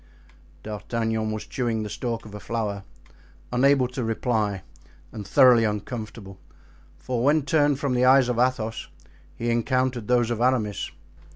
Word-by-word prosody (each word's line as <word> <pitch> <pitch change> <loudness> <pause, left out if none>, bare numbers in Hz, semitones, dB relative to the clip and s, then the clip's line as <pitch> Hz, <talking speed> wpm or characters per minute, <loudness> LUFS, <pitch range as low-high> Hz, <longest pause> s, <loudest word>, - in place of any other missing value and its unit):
D'Artagnan 110 +1 -2
was 110 0 -5
chewing 115 -4 -2
the - - -4
stalk 115 0 -4
of 105 - -11
a 105 - -7
flower, 105 -2 -3 0.7
unable 135 +1 +4
to 125 0 -4
reply 110 -4 -1 0.5
and 105 -3 -8
thoroughly 120 +1 +6
uncomfortable; 105 -2 -5 0.6
for 120 +9 -3
when 145 +2 +3
turned 145 -1 +2
from 140 -3 -1
the 125 0 +2
eyes 130 0 +6
of 120 -1 -1
Athos 120 -3 0 0.5
he 120 0 -2
encountered 125 -1 0
those 120 -1 +2
of 120 -1 -2
Aramis. 120 -6 0
115 Hz, 145 wpm, -25 LUFS, 110-130 Hz, 0.7 s, thoroughly